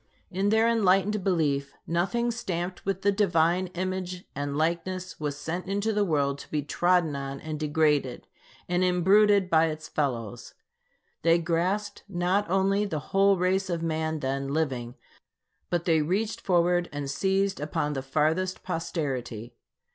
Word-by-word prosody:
In 195 +3 0
their 220 +2 +4
enlightened 205 -2 +2
belief, 145 -7 0
nothing 195 +8 0
stamped 180 -5 -4
with 195 -1 -2
the 200 - +4
Divine 180 -2 +2
image 185 0 -3
and 140 0 -3
likeness 175 +3 -2
was 145 -2 -3
sent 165 +5 -4
into 205 +3 0
the 210 0 +2
world 140 -6 0
to - - -11
be 150 -1 -1
trodden 175 0 +2
on 140 0 -5
and 155 -1 -5
degraded, 150 -4 +1 0.4
and 180 +1 +1
imbruted 195 +2 +4
by 165 -2 +4
its 155 0 -5
fellows. 120 -8 -3 0.7
They 165 +1 +4
grasped 180 +5 -1
not 180 +1 0
only 195 +2 +2
the 155 -7 -5
whole 195 0 +5
race 185 +2 +1
of 170 -2 -2
man 160 -1 -1
then 135 +1 -2
living, 135 -5 -2 0.7
but 175 -1 -1
they 160 -2 +3
reached 215 +8 -1
forward 175 -1 +2
and 145 -1 -4
seized 195 +6 0
upon 150 0 -2
the 135 - -3
farthest 155 +7 0
posterity. 130 - -4
175 Hz, 145 wpm, -27 LUFS, 150-190 Hz, 0.7 s, whole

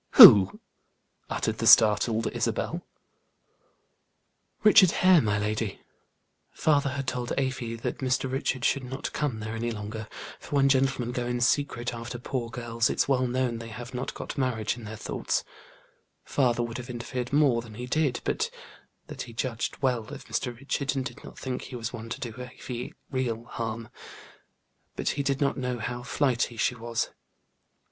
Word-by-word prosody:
"Who?" 95 -3 +10 0.7
uttered - - -1
the - - +1
startled 110 +1 +6
Isabel. - - -1 1.8
"Richard 205 -3 +8 0.2
Hare, 185 -4 +8
my 105 -3 +1
lady. 105 0 -2 0.7
Father 145 -3 +2
had 135 0 -4
told 125 -1 -2
Afy 130 -4 -1
that 115 - -4
Mr. 130 0 0
Richard 130 -1 -1
should 140 - +2
not 130 +2 -5
come 130 -7 -2
there 110 +1 -4
any 120 +1 -2
longer, 110 0 -5 0.3
for - - -6
when 140 -1 +4
gentlemen 135 -3 +2
go 125 -1 -2
in 120 0 -1
secret 120 -1 +1
after 120 +1 -6
poor 120 -1 -3
girls, 115 0 -1
it's - - +1
well 130 -2 +2
known 125 -2 -1
they 115 - -7
have 120 +2 -8
not 125 +1 -4
got - - -6
marriage 120 -5 0
in 120 -2 -10
their 110 +1 -6
thoughts; - - -2 0.8
father 120 -3 +1
would 120 +1 -5
have 125 +1 -8
interfered 125 +1 -4
more 140 -5 +4
than 115 -2 -12
he 125 +2 -5
did, 135 -1 0
but - - 0 0.6
that - - -7
he 115 - -7
judged 115 +2 -3
well 125 -4 +1
of 145 0 -9
Mr. 120 -2 -3
Richard, 140 +1 -1
and 130 -1 -1
did - - -8
not - - -11
think 130 -1 -4
he 130 - -8
was 115 0 -4
one 115 -1 -7
to - - -5
do 120 -3 -5
Afy 125 -1 -7 0.2
real 120 -4 -1
harm, 115 -1 -5 1.1
but - - -1
he 140 - -1
did 140 -1 0
not 140 -1 +1
know 125 -1 -2
how 120 +2 -4
flighty 125 -2 0
she 110 - +2
was. 115 -1 -3
125 Hz, 170 wpm, -27 LUFS, 115-130 Hz, 1.8 s, Who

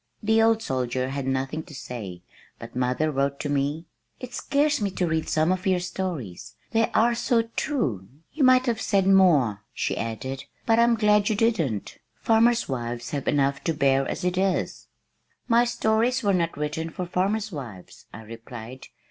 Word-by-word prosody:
The 220 +1 +3
old 225 0 +3
soldier 130 0 -2
had 135 -1 -4
nothing 135 +4 -1
to 150 - -13
say 100 -10 -7 0.3
but - - -11
mother 125 +5 0
wrote 140 0 -1
to 145 - -3
me, 145 +3 -1 0.3
"It 250 -1 -8
scares 290 0 +1
me 205 - +1
to 185 -1 -1
read 160 -1 -1
some 155 +3 +2
of 185 +2 -2
your 185 -1 +3
stories 175 - -5 0.2
they 225 0 +2
are 235 +2 +4
so 235 0 +1
true. 130 - -1 0.3
You 300 - 0
might 255 0 +5
have 235 -3 -1
said 195 -2 +2
more," 155 - +4
she - - -1
added, 130 +4 -5 0.2
"but 225 0 +3
I'm 235 0 +4
glad 210 -2 +3
you 215 - +1
didn't. 180 - -1 0.2
Farmers' 230 +1 +3
wives 120 -2 -4
have 140 -2 -4
enough 140 -1 +1
to 165 - 0
bear 135 -2 +2
as - - -4
it 180 0 0
is." 190 -1 -1 0.6
"My 235 0 +4
stories 230 +1 +1
were 200 -1 +2
not 170 -4 0
written 150 +2 -3
for 180 +2 -5
farmers' 200 +4 -1
wives," 120 - -9
I 110 - -10
replied. 115 +2 -10
165 Hz, 175 wpm, -25 LUFS, 130-220 Hz, 0.6 s, might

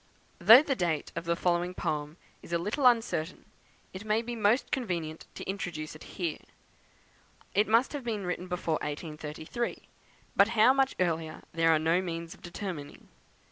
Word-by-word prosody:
Though 225 +10 +9
the 285 - 0
date 170 -7 -1
of 170 +1 -4
the 170 0 +1
following 175 +1 0
poem 150 -1 -3 0.2
is - - -13
a 170 - +2
little 215 - +2
uncertain, 225 -8 +1 0.5
it 185 +2 -7
may 215 +1 +1
be 240 +1 -5
most 220 +3 +2
convenient 170 -10 -3
to - - -6
introduce 175 -6 -4
it 155 - -11
here. 170 -5 -2 1.1
It 210 +2 +3
must 230 +7 +3
have 285 -3 -4
been 215 -5 -3
written 180 +1 -3
before 170 -3 -1
1833, 155 +8 -5 0.5
but 200 - +6
how 235 +5 +7
much 270 -1 +2
earlier 165 -3 -1
there 165 0 +3
are 160 - +5
no 165 +3 +2
means 170 -1 -5
of - - -19
determining. 175 -5 -7
180 Hz, 165 wpm, -29 LUFS, 160-215 Hz, 1.1 s, Though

